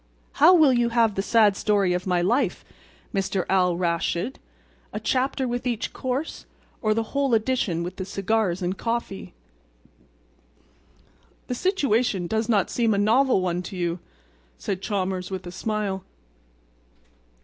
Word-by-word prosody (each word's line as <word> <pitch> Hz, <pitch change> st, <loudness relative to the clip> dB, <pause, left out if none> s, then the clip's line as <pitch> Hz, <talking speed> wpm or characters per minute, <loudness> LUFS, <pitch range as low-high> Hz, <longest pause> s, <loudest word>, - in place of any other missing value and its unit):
How 350 Hz, +5 st, +8 dB
will 305 Hz, -6 st, +6 dB
you 240 Hz, -1 st, +2 dB
have 230 Hz, -2 st, +3 dB
the 195 Hz, -, -1 dB
sad 210 Hz, -1 st, +4 dB
story 200 Hz, -3 st, +2 dB
of 180 Hz, +1 st, -3 dB
my 180 Hz, -1 st, +2 dB
life, 235 Hz, +9 st, 0 dB, 0.5 s
Mr. 195 Hz, -2 st, -1 dB
Al 180 Hz, -2 st, +2 dB
Raschid—a 170 Hz, +6 st, -4 dB
chapter 265 Hz, 0 st, 0 dB
with 245 Hz, +1 st, -3 dB
each 235 Hz, -3 st, -2 dB
course 260 Hz, +4 st, -4 dB, 0.3 s
or 215 Hz, -2 st, +2 dB
the 225 Hz, 0 st, -2 dB
whole 275 Hz, -4 st, +2 dB
edition 220 Hz, -7 st, 0 dB
with 180 Hz, +1 st, -6 dB
the 190 Hz, -, -4 dB
cigars 195 Hz, -1 st, 0 dB
and 180 Hz, +2 st, -1 dB
coffee?" 230 Hz, -, -4 dB, 2.1 s
"The -, -, -3 dB
situation 245 Hz, -, +1 dB
does 220 Hz, +5 st, -1 dB
not 205 Hz, -5 st, +2 dB
seem 230 Hz, -3 st, +2 dB
a -, -, -1 dB
novel 225 Hz, +2 st, +3 dB
one 180 Hz, -1 st, -1 dB
to 185 Hz, +1 st, -8 dB
you," 175 Hz, 0 st, -1 dB, 0.6 s
said 190 Hz, -2 st, -4 dB
Chalmers 190 Hz, -2 st, -2 dB
with 190 Hz, -1 st, -5 dB
a 175 Hz, -, -6 dB
smile. 200 Hz, -1 st, -2 dB
210 Hz, 140 wpm, -24 LUFS, 185-240 Hz, 2.1 s, How